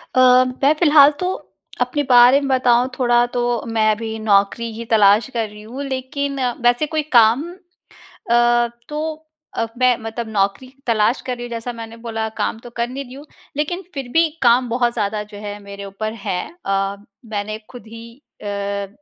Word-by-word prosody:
अ, 255 0 +6 0.2
मैं 285 +3 +6
फिलहाल 295 -3 +7
तो 365 +1 -1 0.5
अपने 290 -2 0
बारे 245 +2 +7
में 280 - -3
बताऊँ 250 -1 +3
थोड़ा, 240 -1 +4
तो 240 -1 -1
मैं 220 -1 +2
अभी 220 +1 -4
नौकरी 215 +2 +1
की 230 +1 -6
तलाश 210 +2 +5
कर 230 -2 -1
रही 210 0 -13
हूँ। 245 +6 -7
लेकिन 275 +1 -3 0.2
वैसे 245 +5 +3
कोई 310 0 -1 0.2
काम 230 +4 +5 0.9
अ, 240 0 +4 0.2
तो 310 +1 -4 0.3
अ, 230 - 0
मैं, 250 -1 +3
मतलब 225 +1 -5
नौकरी 200 +4 -1 0.2
तलाश 225 +1 +2
कर 250 -1 -2
रही 240 - -8
हूँ, - - -8
जैसा 235 +1 -4
मैंने 230 0 -9
बोला 225 -1 -4
काम 220 - -2
तो 240 - -11
कर 235 0 0
नहीं 270 +2 -5
रही 250 - -12
हूँ, 280 +3 -11 0.3
लेकिन 330 +5 -2
फिर 275 -3 -5
भी 330 0 +4
काम 245 0 +4
बहुत 240 0 +1
ज़्यादा 210 -2 -2
जो 210 0 -12
है 205 0 -6
मेरे 200 0 -9
ऊपर 215 +3 -5
है। 180 -1 -1 0.2
अ, 195 0 0 0.3
मैंने 215 -1 -4
ख़ुद 245 -3 -12
ही 230 +1 -10 0.4
अ, 200 -1 -3
235 Hz, 180 wpm, -20 LUFS, 215-255 Hz, 0.9 s, फिलहाल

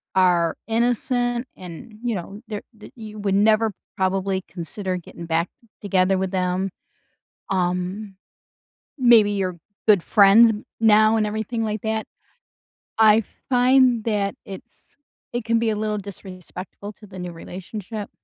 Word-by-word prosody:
are 175 -3 +3
innocent 245 +1 0
and, 185 +4 -10
you 235 -2 0
know, 195 +3 -7
they're 210 -2 -5 0.2
that 215 - -13
you 215 -2 -9
would 200 -1 0
never 215 +1 +3 0.2
probably 190 0 0
consider 185 +3 -4
getting 170 -1 -10
back 165 +1 0 0.3
together 190 -1 +2
with 190 -1 -2
them, 185 +1 0 0.8
um, 185 +2 -1 0.8
maybe 235 -5 +6
you're 185 -3 -2 0.3
good 205 -5 +5
friends 215 +2 +7 0.3
now 215 0 +5
and 215 - +2
everything 220 +2 -2
like 215 -1 -2
that, 220 0 -2 0.9
I 220 0 +6 0.3
find 250 -2 +4
that 205 -3 0
it's 195 -1 -12 0.4
it 240 -1 -2
can 230 0 +2
be 230 -1 +1
a - - -1
little 210 0 -1
disrespectful 190 0 -9
to 210 - -16
the 190 -1 -11
new 180 -1 -5
relationship. 200 +5 -7
205 Hz, 135 wpm, -23 LUFS, 185-220 Hz, 0.9 s, friends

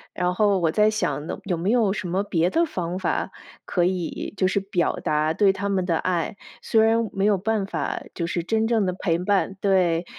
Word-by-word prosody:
然 180 0 0
后 200 -1 +3
我 165 -3 +2
在 210 +5 +3
想 215 -8 -2
呢， - - -5
有 185 -3 -1
没 180 +5 -1
有 230 -5 +3
什 210 - -4
么 190 +3 0
别 175 -3 0
的 335 - +2
方 180 - -4
法 - - -1 0.3
可 175 -2 0
以 180 +1 -3
就 185 - +2
是 195 +1 +1
表 190 -4 -1
达 155 +1 0
对 195 +3 +3
他 200 +1 -3
们 185 -2 0
的 165 -2 +1
爱。 175 +2 -1 0.2
虽 220 - +2
然 225 0 +2
没 195 0 0
有 205 -2 +3
办 210 +1 -1
法 - - -3
就 170 - -2
是 170 0 -2
真 220 +4 +1
正 225 -3 +2
的 185 - 0
陪 175 -2 -1
伴， 195 +1 0
对， 180 -4 +2
190 Hz, 235 characters per minute, -24 LUFS, 175-210 Hz, 0.3 s, 后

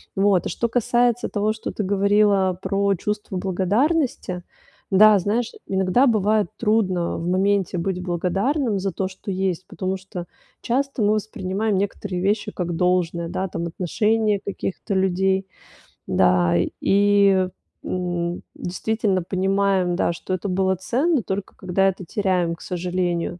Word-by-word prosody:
Вот. 195 -2 +3
А - - -3
что 235 - -1
касается 240 0 +1
того, 210 +1 0
что 220 - -6
ты 210 - -3
говорила 200 -1 +3
про 200 0 +1
чувство 210 0 -3
благодарности. 195 - 0 0.5
Да, 210 +2 +7
знаешь, 220 +5 -1 0.2
иногда 190 +6 +2
бывает 215 -2 +2
трудно 200 -6 +1
в 165 - -4
моменте 190 0 +1
быть 180 +1 -2
благодарным 195 - 0
за 195 0 -2
то, 190 - -2
что 190 +1 -7
есть, 185 -1 -1
потому 190 0 -3
что 185 -2 -8 0.4
часто 275 +1 -1
мы 205 +1 +3
воспринимаем 210 0 -2
некоторые 195 -1 -2
вещи 210 +2 0
как 175 -3 -3
должное, 175 -1 +1
да, 190 +2 -2
там 170 - -4
отношение 210 +5 +1
каких-то 200 0 -4
людей. 190 0 +1 0.6
Да, 90 -2 +3 0.3
и, 200 -2 +4 0.3
м, 175 -1 -2
действительно 195 +1 -1
понимаем, 190 0 +1
да, 170 - +1
что 185 - -5
это 185 +2 -2
было 190 +1 +1
ценно, 270 - +1
только 195 +1 -4
когда 190 +1 +1
это 185 -1 -6
теряем, 180 -3 0
к - - -19
сожалению. 180 -1 -2
190 Hz, 140 wpm, -22 LUFS, 180-210 Hz, 0.6 s, Да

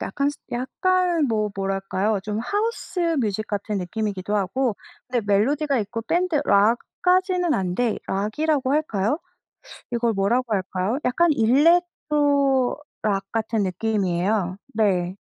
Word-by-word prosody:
약간, 280 0 -1 0.2
약간 340 +6 +1
뭐 215 -3 0
뭐랄까요? 195 +1 -1
좀 210 +1 -3
하우스 410 - -2 0.2
뮤직 215 -1 -1
같은 205 +1 -3
느낌이기도 200 +1 -3
하고 210 +4 0 0.3
근데 245 -1 0
멜로디가 275 +8 +2
있고 220 +3 -4
밴드 340 +4 +1
락까지는 360 - +2
아닌데 195 +2 0
락이라고 260 +8 0
할까요? 285 -4 0 0.7
이걸 235 -1 +1
뭐라고 225 +4 +1
할까요? 190 +4 -1
약간 330 +7 +3
일렉트로 285 -1 +2 0.2
락 195 -2 0
같은 225 -1 0
느낌이에요. 190 -1 0 0.2
네. 190 -4 +1
225 Hz, 280 characters per minute, -23 LUFS, 200-285 Hz, 0.7 s, 약간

